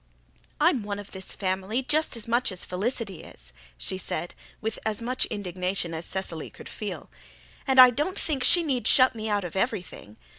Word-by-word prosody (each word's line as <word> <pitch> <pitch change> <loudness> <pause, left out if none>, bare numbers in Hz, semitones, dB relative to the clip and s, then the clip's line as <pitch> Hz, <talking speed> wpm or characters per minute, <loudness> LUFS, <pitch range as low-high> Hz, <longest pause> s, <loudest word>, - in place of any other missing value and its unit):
"I'm 250 - +4
one 205 -1 -4
of 205 -1 -9
this 190 -1 -5
family 195 +6 -1
just 300 -1 +1
as 225 - -6
much 240 0 +2
as 185 - -3
Felicity 200 -1 -2
is," - - -10 0.2
she 185 - -3
said, 175 -1 -3 0.3
with 220 0 -3
as 215 -1 0
much 250 +2 -1
indignation 185 -3 -3
as 160 +1 -4
Cecily 180 -5 -3
could - - -12
feel, 195 -7 -6 0.6
"and 265 -1 +4
I 255 -1 +11
don't 300 - -1
think 280 -5 0
she 350 +5 +5
need 265 -6 0
shut 260 0 +6
me 220 -1 -3
out 205 -1 +1
of 175 0 -6
everything. 180 - -3
205 Hz, 185 wpm, -27 LUFS, 185-250 Hz, 0.6 s, I